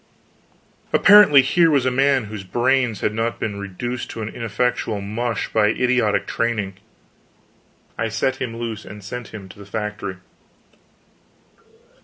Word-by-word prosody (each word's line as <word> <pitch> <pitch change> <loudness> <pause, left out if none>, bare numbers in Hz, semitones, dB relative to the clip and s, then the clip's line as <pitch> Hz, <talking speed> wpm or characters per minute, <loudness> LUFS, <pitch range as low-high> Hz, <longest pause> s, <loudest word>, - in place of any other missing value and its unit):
Apparently 195 -10 +7
here 165 +5 +3
was 140 -4 +2
a 130 - +2
man 135 0 +2
whose 105 -2 -7
brains 120 +3 +1
had 105 - 0
not 115 +1 -2
been 100 -2 -3
reduced 120 +6 -5
to 110 - -6
an 105 - -4
ineffectual 115 -1 -2
mush 115 +4 -3
by 110 -1 +4
idiotic 120 -1 +1
training. 110 -4 -2 1.3
I 115 0 0
set 125 +4 -1
him 115 -3 -4
loose 115 -2 -5
and 105 0 -11
sent 120 +5 -6
him 100 -3 -10
to 100 - -14
the - - -9
Factory. 105 -2 -4
115 Hz, 140 wpm, -21 LUFS, 105-125 Hz, 1.3 s, Apparently